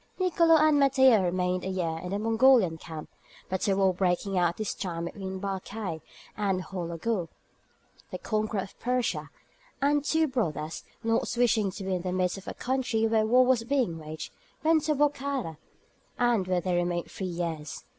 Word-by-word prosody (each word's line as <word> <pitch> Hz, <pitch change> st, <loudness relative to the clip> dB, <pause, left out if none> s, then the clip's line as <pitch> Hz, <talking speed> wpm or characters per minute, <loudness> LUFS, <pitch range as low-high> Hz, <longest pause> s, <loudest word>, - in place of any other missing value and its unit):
Nicolo 335 Hz, -3 st, +4 dB
and 310 Hz, -2 st, +4 dB
Matteo 265 Hz, -5 st, +5 dB
remained 180 Hz, 0 st, 0 dB
a -, -, -3 dB
year 170 Hz, -4 st, -2 dB
in 180 Hz, -, -6 dB
the 200 Hz, -, -1 dB
Mongolian 225 Hz, -4 st, +4 dB
camp, 160 Hz, -2 st, -8 dB, 0.4 s
but 190 Hz, +2 st, -1 dB
a 195 Hz, -, +3 dB
war 190 Hz, -1 st, +3 dB
breaking 185 Hz, +1 st, 0 dB
out 175 Hz, -1 st, +3 dB
at 170 Hz, -, -8 dB
this 215 Hz, -2 st, -2 dB
time 170 Hz, -3 st, -4 dB
between 190 Hz, +1 st, -6 dB
Barkaï, 195 Hz, -3 st, -4 dB, 0.3 s
and 195 Hz, -3 st, 0 dB
Houlagou, 180 Hz, +1 st, -3 dB, 0.8 s
the -, -, -5 dB
conqueror 215 Hz, -2 st, -1 dB
of 190 Hz, -, -11 dB
Persia, 250 Hz, 0 st, -1 dB, 0.5 s
the 290 Hz, +1 st, +2 dB
two 320 Hz, +2 st, +2 dB
brothers, 160 Hz, -, -2 dB, 0.2 s
not 225 Hz, 0 st, +1 dB
wishing 225 Hz, -4 st, +3 dB
to 200 Hz, -, -7 dB
be 190 Hz, 0 st, -2 dB
in 180 Hz, -, -1 dB
the 180 Hz, 0 st, -3 dB
midst 185 Hz, +1 st, 0 dB
of 195 Hz, -, -17 dB
a -, -, -5 dB
country 250 Hz, -3 st, 0 dB
where 220 Hz, -1 st, +2 dB
war 250 Hz, +3 st, +5 dB
was 250 Hz, -2 st, +3 dB
being 235 Hz, -10 st, 0 dB
waged, 155 Hz, 0 st, -7 dB, 0.3 s
went 315 Hz, -1 st, +3 dB
to 305 Hz, 0 st, +2 dB
Bokhara, 280 Hz, -, -1 dB, 0.6 s
and 235 Hz, -6 st, +2 dB
there 180 Hz, -1 st, +1 dB
they 180 Hz, +1 st, -1 dB
remained 175 Hz, 0 st, -1 dB
three 190 Hz, -, -4 dB
years. 165 Hz, -4 st, -4 dB
195 Hz, 175 wpm, -28 LUFS, 180-250 Hz, 0.8 s, Matteo